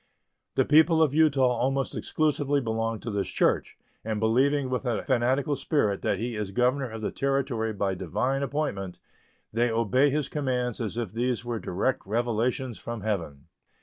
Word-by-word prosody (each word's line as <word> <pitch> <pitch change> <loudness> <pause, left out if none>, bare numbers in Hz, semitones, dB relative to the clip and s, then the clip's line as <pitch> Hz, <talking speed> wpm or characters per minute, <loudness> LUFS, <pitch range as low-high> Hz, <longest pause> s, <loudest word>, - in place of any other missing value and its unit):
The - - +3
people 160 +2 +5
of 145 -3 +1
Utah 150 -3 +4 0.2
almost 135 +2 0
exclusively 145 -2 0
belong 115 -2 -2
to 115 - -4
this 100 -2 -2
church, - - +1 0.3
and 110 -1 -2
believing 130 +5 +2
with 125 - -1
a 120 -4 -1
fanatical 130 +3 +1
spirit 105 -10 0
that - - 0
he 115 +3 -3
is 105 -2 -3
governor 125 +5 +1
of 110 -1 -7
the - - -1
Territory 135 -5 -1
by 100 -2 -1
divine 125 - -1
appointment, 140 - -2 0.6
they 120 +2 +2
obey 115 +5 +3
his 145 0 0
commands 125 -5 -2
as 110 0 -3
if 115 -6 -2
these 120 0 -1
were 120 -2 -2
direct 105 +9 -1
revelations 120 +2 -1
from 115 -2 -6
Heaven. 85 -10 -3
120 Hz, 165 wpm, -27 LUFS, 110-135 Hz, 0.6 s, people